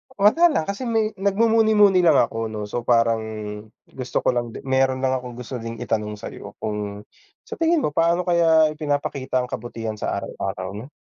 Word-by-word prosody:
Wala 215 +13 +5
lang. 300 - 0
Kasi 200 +9 -4
may 220 -2 +1
nagmumuni-muni 210 -1 +4
lang 170 -2 +5
ako 115 0 +1
'no, 110 -1 -5
so 105 +4 -3
parang 115 -1 +2 0.6
gusto 130 -1 -4
ko - - +3
lang 120 -2 -3
di - - -8
meron 130 0 +1
lang 130 0 +1
akong 125 -1 -9
gusto 125 +1 -6
ding 115 0 -6
itanong 105 -1 -2
sa'yo. 105 - -9
Kung 105 -1 -4 0.4
sa - - -9
tingin 330 -2 +2
mo, - - 0
paano 170 +3 +2
kaya 165 -3 +4
ipinapakita 145 -4 -2
ang 125 - -8
kabutihan 115 -3 -5
sa - - -2
araw-araw 95 -1 -4
'no? 105 +5 -8
130 Hz, 180 wpm, -22 LUFS, 115-185 Hz, 0.6 s, Wala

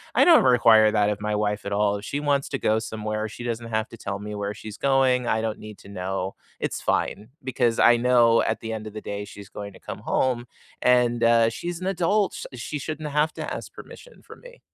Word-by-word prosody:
I - - +6
don't 335 -3 +7
require 115 -3 +6
that 105 -1 +2
of 105 0 -4
my 105 0 -1
wife 105 0 -1
at 100 - -4
all. 105 0 +2
If 100 - -9
she 140 - -3
wants 145 -1 0
to 135 - -2
go 110 -3 +1
somewhere, 110 -1 -4
she 120 - -9
doesn't 115 -1 -3
have 110 0 -1
to 115 - -11
tell 100 -2 -4
me 105 +1 -7
where 105 0 -4
she's 110 0 -9
going, 130 -2 +2
I 110 - +1
don't 110 -1 -3
need 105 -1 -10
to - - -14
know, 95 0 -3 0.3
it's - - -3
fine 105 - -1 0.2
because 125 -3 0
I 120 0 +6
know 120 -1 +4
at - - -1
the 115 0 -4
end 110 -1 -5
of 105 - -9
the 110 - -6
day 100 0 -5
she's 100 -1 -12
going 100 0 -8
to - - -15
come - - -7
home 125 -2 0 0.3
and, 120 -1 +3
uh, 115 -1 +5
she's 170 +8 -5
an - - -4
adult, 195 +2 +1
sh - - -7 0.3
she - - -2
shouldn't 155 +1 -5
have 150 +2 +2
to - - -5
ask - - -7
permission - - -13
from - - -14
me. - - -14
115 Hz, 240 wpm, -24 LUFS, 105-130 Hz, 0.3 s, don't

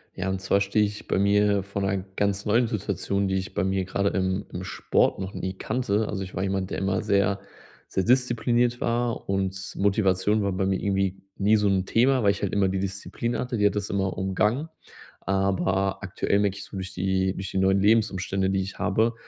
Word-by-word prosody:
Ja, 95 +1 -2
und 95 0 -2
zwar 100 +1 +2
stehe 105 +2 +2
ich 105 0 -7
bei - - +1
mir 100 0 +3
von 100 0 -4
'ner 95 0 +1 0.2
ganz 100 0 0
neuen 115 +3 +3
Situation, 100 -1 -1
die 95 - 0
ich 95 0 -3
bei 100 - 0
mir 95 0 0
gerade 100 +1 0
im 95 +1 -1
im 90 - -5
Sport - - +1
noch 95 +1 -5
nie 95 - -3
kannte. 105 0 -1
Also 95 -2 -3
ich 95 - -9
war 95 - -1
jemand, 95 -1 -2
der - - -2
immer 95 0 0
sehr 100 -1 +2 0.5
sehr 95 - -1
diszipliniert 120 0 +2
war 120 -2 -1
und 95 0 -2
Motivation 100 0 +2
war 100 - 0
bei 95 +1 -1
mir 95 -1 0
irgendwie 95 -1 0 0.2
nie 105 +2 +4
so 105 -1 +2
'n 95 -1 +1
Thema, 125 +4 +3
weil 100 - +5
ich 100 - -5
halt 100 - -2
immer 100 -1 +3
die 95 0 -1
Disziplin 100 +5 -3
hatte, 125 -1 -2
die 105 - +2
hat 105 - +3
das 105 -1 -2
immer 95 -1 -1
umgangen. 105 +10 0 0.5
Aber 95 0 0
aktuell 100 +1 0
merke 100 -2 +1
ich 100 - -7
so - - -9
durch 95 0 -6
die 95 0 0
durch 95 0 -6
die - - -3
neuen 95 +1 +3
Lebensumstände, 95 -3 +2
die 95 0 +1
ich 95 +1 -7
habe, 110 +4 +2
100 Hz, 215 wpm, -26 LUFS, 95-105 Hz, 0.5 s, weil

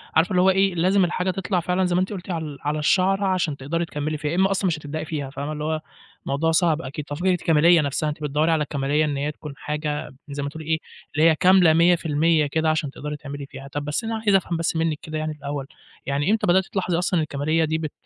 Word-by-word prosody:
عارفة 160 +4 +3
اللي 180 - +3
هو 190 - +5
إيه، 190 -1 +2
لازم 185 +3 +3
الحاجة 180 +2 -1
تطلع 185 0 -1
فعلًا 180 +2 0
زي 180 - 0
ما 180 - +3
أنتِ 185 +3 -2
قُلتِ 185 -1 -8
عل 155 -4 -4
على 150 +1 -1
الشَعْرة 190 +6 +2
عشان 180 -6 0
تقدري 165 +6 -2
تكمِّلي 155 0 -3
فيها، 150 +1 -3
يا - - -1
إمّا 190 +1 +3
أصلًا 195 0 +1
مش 170 - 0
هتبدأي 155 +1 -5
فيها 145 -4 -4
فاهمة، 140 +2 -5
اللي 150 0 -4
هو 155 0 -1 0.4
موضوع 160 +4 0
صعب 165 -1 +2
أكيد. 140 +2 -6
ففكرة 175 +6 -1
الكَمالية 165 -1 +4
نَفْسها، 150 +2 -1
أنتِ 150 0 -6
بتدوَّري 150 +3 +1
على 155 -2 +2
الكَمالية 145 +1 0
إن 145 -2 -2
هي 145 +2 -1
تكون 150 -1 -9
حاجة 150 -2 -4
زي 140 0 -4
ما 140 - -2
تقولي 155 +1 -9
إيه، 160 0 0 0.4
اللي 160 +2 +5
هي 160 - +3
كاملة 180 -1 +5
100% 165 -2 +3
كده 160 +2 0
عشان 155 -3 0
تقدري 150 +1 -6
تعملي 145 -1 -7
فيها. 135 -1 -10
طَب 145 +1 -5
بس 150 +10 -2
أنا 225 0 -2
عايز 210 -3 +2
أفهم 180 -3 +1
بس 165 0 -1
منِّك 160 -1 0
كده 155 0 -5
يعني 155 0 -2
الأول، 140 -2 -5 0.4
يعني 145 +7 0
إمتى 220 - +1
بدأتِ 185 +2 +4
تلاحظي 180 -3 -1
أصلًا 175 -1 +1
الكَمالية 155 +2 0
دي 160 +1 -1
بت 155 -2 -4
160 Hz, 245 wpm, -23 LUFS, 150-180 Hz, 0.4 s, هو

